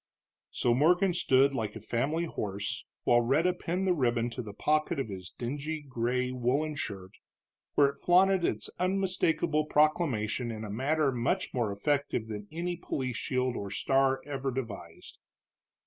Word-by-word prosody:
So 120 Hz, -, +1 dB
Morgan 175 Hz, +8 st, +4 dB
stood 140 Hz, -5 st, +4 dB
like 110 Hz, -5 st, -3 dB
a -, -, -6 dB
family 145 Hz, +8 st, -1 dB
horse 100 Hz, -9 st, -4 dB, 0.2 s
while 120 Hz, 0 st, +4 dB
Rhetta 150 Hz, +9 st, +2 dB
pinned 180 Hz, +2 st, -2 dB
the 185 Hz, -, +3 dB
ribbon 120 Hz, -5 st, +1 dB
to 125 Hz, -, -4 dB
the 110 Hz, -3 st, -7 dB
pocket 155 Hz, +8 st, 0 dB
of 135 Hz, -, -2 dB
his 95 Hz, -2 st, -7 dB
dingy 145 Hz, +7 st, -4 dB
gray 125 Hz, 0 st, -1 dB
woolen 130 Hz, +5 st, 0 dB
shirt, 95 Hz, -8 st, -5 dB, 0.6 s
where 145 Hz, -, +6 dB
it 140 Hz, -, -10 dB
flaunted 185 Hz, +1 st, +4 dB
its 105 Hz, -8 st, -1 dB
unmistakable 180 Hz, -4 st, +1 dB
proclamation 135 Hz, -7 st, +1 dB
in 110 Hz, -1 st, -5 dB
a 105 Hz, -, -5 dB
manner 140 Hz, +5 st, +1 dB
much 130 Hz, +10 st, -1 dB
more 120 Hz, -5 st, 0 dB
effective 125 Hz, +1 st, -1 dB
than 105 Hz, -1 st, -6 dB
any 175 Hz, +2 st, -3 dB
police 130 Hz, -7 st, -3 dB
shield 130 Hz, -1 st, -1 dB
or 100 Hz, -, -4 dB
star 135 Hz, +5 st, +1 dB
ever 135 Hz, -2 st, -3 dB
devised. 110 Hz, -10 st, -7 dB
135 Hz, 155 wpm, -30 LUFS, 115-155 Hz, 0.6 s, where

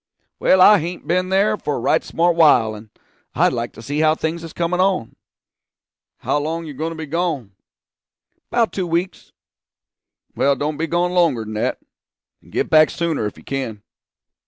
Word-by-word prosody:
'Well, 185 Hz, -, +4 dB
I 205 Hz, +2 st, +8 dB
hain't 175 Hz, +3 st, -6 dB
b'en 185 Hz, +2 st, 0 dB
there 200 Hz, +3 st, +2 dB
for 145 Hz, -6 st, -3 dB
a -, -, -3 dB
right 120 Hz, -, +1 dB
smart 170 Hz, 0 st, +1 dB
while, 125 Hz, -9 st, +4 dB
and 110 Hz, +1 st, -11 dB, 0.5 s
I'd -, -, +3 dB
like 120 Hz, 0 st, -3 dB
to 115 Hz, -, -12 dB
see 145 Hz, +5 st, -3 dB
how 155 Hz, 0 st, +3 dB
things 160 Hz, +1 st, -3 dB
is 165 Hz, -, -8 dB
comin' 175 Hz, +1 st, -2 dB
on.' 185 Hz, -11 st, 0 dB, 1.0 s
'How 145 Hz, -, -1 dB
long 160 Hz, +3 st, -3 dB
are -, -, -9 dB
you 150 Hz, -, -7 dB
going 155 Hz, +4 st, -3 dB
to 165 Hz, -, -7 dB
be 160 Hz, 0 st, -6 dB
gone?' 155 Hz, -, -2 dB, 1.0 s
''Bout 235 Hz, -2 st, +2 dB
two 185 Hz, -3 st, -3 dB
weeks.' 170 Hz, +3 st, -3 dB, 1.0 s
'Well 140 Hz, 0 st, +2 dB
don't 145 Hz, +2 st, -3 dB
be 165 Hz, -, -2 dB
gone 175 Hz, +2 st, 0 dB
longer 165 Hz, -10 st, +2 dB
than 110 Hz, -, -7 dB
that; 105 Hz, -, -2 dB, 0.6 s
and -, -, -20 dB
get -, -, -1 dB
back 155 Hz, 0 st, +5 dB
sooner 165 Hz, -10 st, -2 dB
if 105 Hz, -, -9 dB
you -, -, -15 dB
can.' 115 Hz, -7 st, -5 dB
160 Hz, 185 wpm, -20 LUFS, 140-175 Hz, 1.0 s, I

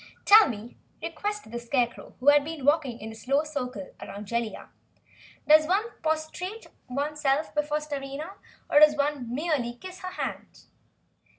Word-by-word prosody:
"Tell 425 Hz, -3 st, +8 dB
me," 225 Hz, 0 st, -7 dB, 0.3 s
requested 415 Hz, -, -4 dB
the 235 Hz, -, -4 dB
Scarecrow, 240 Hz, 0 st, -2 dB
who 265 Hz, +4 st, +5 dB
had 290 Hz, 0 st, +6 dB
been 310 Hz, -3 st, -6 dB
walking 290 Hz, -5 st, +2 dB
in 220 Hz, 0 st, -7 dB
a -, -, -9 dB
slow 265 Hz, +7 st, 0 dB
circle 250 Hz, -, -5 dB
around 205 Hz, +1 st, -7 dB
Jellia. 235 Hz, +1 st, -3 dB, 0.8 s
"Does 310 Hz, +1 st, +7 dB
one 415 Hz, +6 st, +1 dB
prostrate 320 Hz, +7 st, -3 dB, 0.2 s
oneself 290 Hz, +2 st, 0 dB
before 300 Hz, 0 st, 0 dB
a -, -, -4 dB
Starina, 290 Hz, +2 st, -5 dB, 0.4 s
or 295 Hz, -, +5 dB
does 300 Hz, 0 st, +7 dB
one 280 Hz, -4 st, -1 dB
merely 270 Hz, -4 st, -1 dB
kiss 370 Hz, +8 st, -10 dB
her 370 Hz, 0 st, -6 dB
hand?" -, -, -6 dB
290 Hz, 155 wpm, -27 LUFS, 250-315 Hz, 0.8 s, Tell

